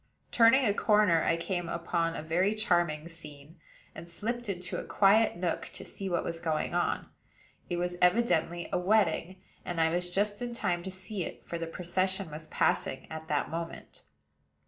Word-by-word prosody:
Turning 245 +3 +6
a 205 - +3
corner, 210 -6 +4
I 165 - +2
came 175 0 -3
upon 170 0 -1
a - - -5
very 180 +6 +1
charming 170 -8 +1
scene, 155 -1 -13 0.3
and 170 +1 -10
slipped 235 +6 -4
into 180 -2 -3
a - - -5
quiet 215 +3 +4
nook 175 -1 -2
to - - -7
see 195 -1 -5
what 175 -2 0
was 165 -1 -4
going 160 -2 -1
on. - - 0 0.6
It 175 - -1
was 175 0 -2
evidently 180 -3 +2
a - - +2
wedding; 185 -2 +1 0.2
and 175 -2 -4
I 160 0 +3
was 175 +1 0
just 205 +4 0
in 240 -1 -3
time 175 -6 -1
to 190 - -5
see 185 +1 -4
it, - - -8
for 170 - -4
the 165 - -3
procession 185 +1 -1
was 155 +1 -8
passing 130 - 0
at 160 0 -7
that 150 -2 -1
moment. 165 0 -6
175 Hz, 180 wpm, -30 LUFS, 165-195 Hz, 0.6 s, Turning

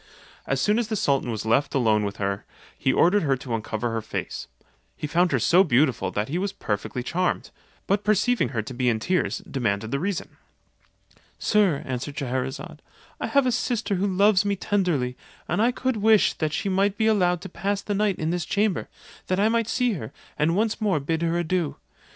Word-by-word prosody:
As - - 0
soon 210 +2 +2
as 235 - -1
the 220 - -2
sultan 140 - +1
was 110 -2 -3
left 125 +7 +1
alone 110 -5 +3
with 100 -1 -3
her, 100 0 -2 0.3
he 130 - +1
ordered 185 +9 +4
her 140 -4 +1
to 125 -1 -6
uncover 115 +1 -2
her 115 0 -2
face: - - -5 0.5
he - - -4
found 175 +4 +2
her - - +3
so 180 +3 +5
beautiful 125 - +2
that 105 +3 -2
he 165 +6 -2
was 200 +1 -1
perfectly 110 - -3
charmed; 180 +7 -1 0.3
but 200 +1 +1
perceiving 215 +4 +2
her 115 -5 -2
to 130 - -8
be 125 0 +1
in 110 -2 +1
tears, 180 +10 -1
demanded 110 -4 -1
the 140 - 0
reason. 185 +2 -3 1.0
"Sir," 200 -9 +2
answered 130 +3 -4
Scheherazade, 130 0 -4 0.4
"I - - -2
have 280 -2 +3
a 250 - +2
sister 235 -3 -1
who 195 +1 +1
loves 200 +1 +4
me 200 0 0
tenderly, 175 -11 0 0.3
and - - 0
I 235 +2 +4
could 255 -1 -1
wish 215 0 +4
that 155 -2 -2
she 200 - -2
might 195 +1 +1
be 220 - +1
allowed 180 -5 +3
to - - -7
pass 200 +2 -2
the 205 - -2
night 205 -1 +1
in 160 +1 -1
this 175 -2 -2
chamber, 205 -3 0 0.4
that 185 +1 0
I 210 +2 +4
might 230 -1 +1
see 245 0 +1
her, 125 - -6 0.2
and 155 +3 +1
once 220 +2 0
more 200 -7 +2
bid 160 +3 -2
her 170 0 +1
adieu. 175 -2 -1
175 Hz, 205 wpm, -25 LUFS, 130-205 Hz, 1.0 s, so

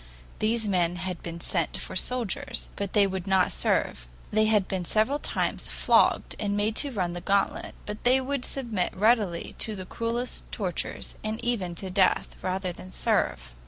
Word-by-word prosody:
These 225 +1 +2
men 180 -3 +1
had 180 0 -4
been 170 0 -6
sent - - 0
for - - -6
soldiers, 245 -6 -2
but 200 -2 -4
they 205 -2 +6
would 190 -1 -3
not 190 -1 +3
serve; - - 0 0.2
they 215 +1 +4
had 210 -3 +3
been 190 -2 -2
several 220 - +2
times - - -1
flogged - - +3
and 205 -1 0
made 215 +2 +1
to 285 - +3
run 185 -8 -1
the 175 - -5
gauntlet, 200 +2 0
but 210 0 -6
they 255 +2 +5
would 270 0 -2
submit 230 -11 -1
readily 210 -5 +2
to 220 - +1
the 185 -2 -6
cruelest 235 +5 -3
tortures, 185 -6 -3
and 215 +1 -2
even 195 -8 0
to 190 +2 -5
death, 190 -1 +2
rather 185 0 -1
than 185 +2 -11
serve. - - 0
200 Hz, 175 wpm, -27 LUFS, 185-225 Hz, 0.2 s, they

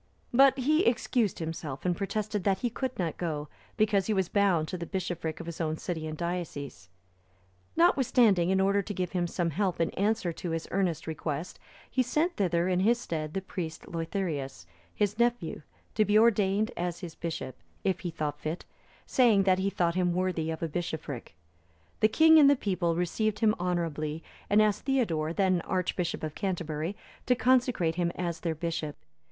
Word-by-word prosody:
But 270 +2 +6
he 305 +6 +3
excused 235 -2 +1
himself, 160 -4 -5
and 180 -1 +2
protested 205 +1 -2
that 195 0 +1
he 245 -2 0
could 255 +1 -3
not 170 -4 -2
go, 150 -4 -3 0.3
because 205 -3 +2
he 215 - +1
was 190 -2 0
bound 190 -6 +2
to 185 - -3
the 170 - -5
bishopric 175 -4 -3
of 170 - -7
his 170 0 -5
own 155 -1 -1
city 160 -3 -4
and 155 0 -5
diocese; 165 - -5 0.9
notwithstanding, 245 - +4
in 190 0 +3
order 200 +1 +3
to 205 +1 -5
give 180 -1 -2
him 175 -2 0
some 170 -1 -1
help 185 +3 -1
in 165 - +1
answer 200 -3 0
to 175 - -5
his 165 0 -3
earnest 180 -5 0
request, 160 +1 -4 0.3
he 260 - +1
sent 305 +8 0
thither 175 -3 +1
in 180 -1 +1
his 230 +5 +3
stead 155 -7 -4
the 190 - -2
priest 165 -4 -5
Leutherius,(330) 160 - -4 0.3
his 210 +1 0
nephew, 235 -10 0 0.3
to 215 - +3
be 210 0 +3
ordained 215 -1 +3
as 175 +1 -3
his 175 -3 -6
bishop, 160 -7 -5 0.3
if 190 -2 +1
he 180 - -4
thought 150 -3 -3
fit, 155 +4 -4 0.4
saying 230 -6 +4
that 185 -1 +3
he 195 +1 +1
thought 175 -3 +1
him 180 -1 +1
worthy 180 -3 -1
of 160 0 -4
a - - +1
bishopric. 150 - -5 0.6
The 215 - +5
king 320 +7 +6
and 285 -2 +8
the 285 - +6
people 180 -8 0
received 205 +5 0
him 215 0 +3
honourably, 165 -3 -2 0.3
and 210 +1 +5
asked 210 +1 0
Theodore, 175 - +1
then 185 -1 +2
Archbishop 180 -2 -2
of 155 -1 -3
Canterbury, 170 -2 -3 0.3
to 250 - +4
consecrate 245 -9 +2
him 175 -1 +1
as 170 -2 -3
their 165 -2 -2
bishop. 160 -2 -3
180 Hz, 180 wpm, -29 LUFS, 165-210 Hz, 0.9 s, and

